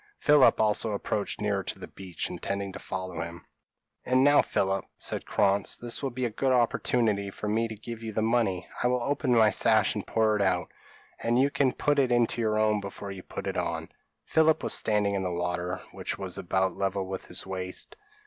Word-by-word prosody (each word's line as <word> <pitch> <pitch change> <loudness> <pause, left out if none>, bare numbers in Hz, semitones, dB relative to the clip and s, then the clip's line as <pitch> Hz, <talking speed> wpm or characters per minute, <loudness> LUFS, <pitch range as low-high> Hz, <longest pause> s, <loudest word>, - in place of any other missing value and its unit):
Philip 150 -2 +5
also 110 0 +2
approached 100 0 -2
nearer 100 -1 0
to - - -5
the - - -8
beach, 95 -3 -5
intending 100 -1 -4
to 100 - -7
follow 95 -3 -5
him. 85 +1 -7 0.6
"And 130 +1 +3
now, 145 +1 +6
Philip," 95 0 0
said - - -4
Krantz, 100 0 +1
"this 120 -1 -5
will 135 - -1
be 130 0 -3
a 120 - -2
good 130 +5 0
opportunity 115 -4 +1
for 105 - -6
me 110 +2 +1
to 110 - -7
give 115 +2 -8
you 110 -1 -5
the 110 +1 -1
money. 110 -6 +1
I - - +3
will 125 -1 +1
open 135 -2 +1
my 110 -2 +5
sash 110 +1 +3
and 105 - -5
pour 110 -1 +2
it 105 - 0
out, 90 -3 +1 0.5
and 120 +1 +1
you 140 +2 +3
can 140 -3 +2
put 145 +2 +1
it 130 -3 +2
into 120 -1 +2
your 110 -1 +1
own 110 -1 +2
before 100 0 -7
you 95 -1 -7
put - - -7
it - - -3
on." - - -2 0.4
Philip 160 0 +3
was - - +1
standing 105 -2 +1
in 100 - 0
the 95 - -1
water, 90 +1 -2
which - - -4
was - - -4
about 95 +1 0
level 95 -1 -1
with 95 0 -6
his 90 - -4
waist. 95 -1 -4
105 Hz, 210 wpm, -28 LUFS, 95-120 Hz, 0.6 s, now